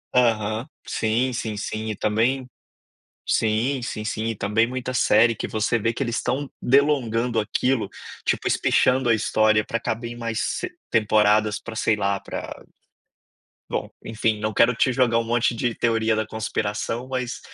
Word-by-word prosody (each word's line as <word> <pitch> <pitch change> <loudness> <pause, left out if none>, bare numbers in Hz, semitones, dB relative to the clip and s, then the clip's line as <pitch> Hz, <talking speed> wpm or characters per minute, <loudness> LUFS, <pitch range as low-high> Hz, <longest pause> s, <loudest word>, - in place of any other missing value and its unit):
Aham. 115 -1 +2 0.2
Sim, 115 +4 0
sim, 110 -3 -3
sim 110 +2 -4
e 110 - -2
também 120 +6 0 0.8
sim, 115 +5 +1
sim, 110 -2 -4
sim 110 0 -2
e 115 - -2
também 105 +3 +1
muita 130 0 -4
série 115 -1 +4
que - - -4
você 110 +2 0
vê 115 +2 +1
que 135 - -2
eles 120 -2 -2
estão 140 +2 -1
delongando 125 -4 +2
aquilo, 115 0 0 0.4
tipo - - 0
espichando 130 -1 +2
a 115 - +5
história 110 -1 +2
pra 115 - -2
caber 115 +1 -3
em - - -7
mais 115 -2 -3 0.2
s 365 - -4 0.2
temporadas 105 -1 +3
pra, 115 - -9
sei 110 0 +2
lá 100 -1 0
pra 100 - -6 1.2
bom - - -2 0.2
enfim 110 -1 0
não 110 +1 -2
quero 115 +3 +4
te 130 +2 +2
jogar 120 -2 +3
um 115 - 0
monte 120 +1 +1
de 115 0 -1
teoria 115 -1 +1
da 110 -1 -1
conspiração, 110 +2 -3
mas 130 -2 -3
115 Hz, 165 wpm, -23 LUFS, 110-120 Hz, 1.2 s, a